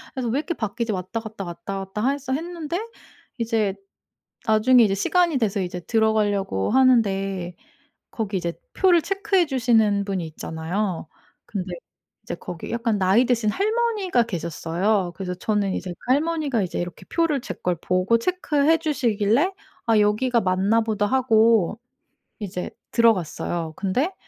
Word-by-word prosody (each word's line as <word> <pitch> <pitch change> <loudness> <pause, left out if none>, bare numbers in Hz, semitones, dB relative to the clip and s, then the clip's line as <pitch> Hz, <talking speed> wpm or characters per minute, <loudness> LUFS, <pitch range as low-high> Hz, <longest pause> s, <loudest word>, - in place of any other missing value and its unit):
그래서 255 -3 -2
왜 240 +5 0
이렇게 340 +3 -3
바뀌지 225 -1 -2
왔다 190 +4 -3
갔다 220 -3 -7
왔다 175 +3 -6
갔다 210 +6 -2
해서 275 -2 -3
했는데 335 +2 -3 0.6
이제 220 -4 0 0.7
나중에 225 +3 +5
이제 195 -2 +2
시간이 340 - +2
돼서 210 -4 0
이제 180 0 -4
들어가려고 205 - +1
하는데 195 -8 +2 0.6
거기 205 -4 -2
이제 170 -1 -2 0.2
표를 355 -3 +4
체크해 390 -2 +1
주시는 225 -6 +2
분이 190 -4 -2
있잖아요. 165 +3 -3 0.4
근데 185 -3 -4 0.5
이제 225 - -5
거기 170 -1 -7
약간 230 -3 0
나이 195 +7 +4
드신 235 -3 +1
할머니가 415 - +1
계셨어요. 175 0 -1
그래서 180 0 -4
저는 200 +1 -1
이제 180 0 -4
그 250 - -3
할머니가 295 -5 0
이제 180 - -3
이렇게 175 -1 -6
표를 330 -5 +1
제 - - -6
걸 180 -1 -1
보고 185 +5 +2
체크해 320 -1 +2
주시길래 255 - +1 0.4
'아 225 -2 +4
여기가 225 +4 +2
맞나 190 +4 +2
보다.' 215 -2 0
하고 225 -5 +3 0.6
이제 180 -4 -4 0.2
들어갔어요. 175 -7 +1
근데 255 - 0
220 Hz, 325 characters per minute, -23 LUFS, 190-260 Hz, 0.7 s, 나중에